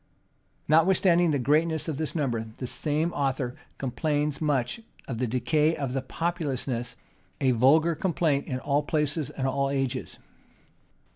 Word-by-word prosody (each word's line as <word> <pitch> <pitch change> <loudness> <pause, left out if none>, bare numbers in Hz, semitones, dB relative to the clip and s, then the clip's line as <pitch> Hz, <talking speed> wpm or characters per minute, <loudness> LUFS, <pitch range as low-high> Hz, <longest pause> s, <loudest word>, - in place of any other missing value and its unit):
Notwithstanding 175 +2 +4
the 145 - +2
greatness 155 +5 +1
of 155 -4 -2
this 155 +1 -3
number, 120 -8 -1
the 130 - -4
same 155 +6 -1
author 135 -3 -1 0.2
complains 145 +3 -1
much 145 - 0 0.3
of 115 -4 -4
the 125 - 0
decay 140 +7 +1
of 135 -3 -3
populousness; 135 -8 -2 0.4
a 130 -2 +3
vulgar 145 +8 +4
complaint 155 -3 0
in 130 - -2
all 140 +2 +1
places 150 -1 -1
and 140 -3 -4
all 140 +1 0
ages. 135 -2 -2
145 Hz, 135 wpm, -27 LUFS, 130-160 Hz, 0.4 s, Notwithstanding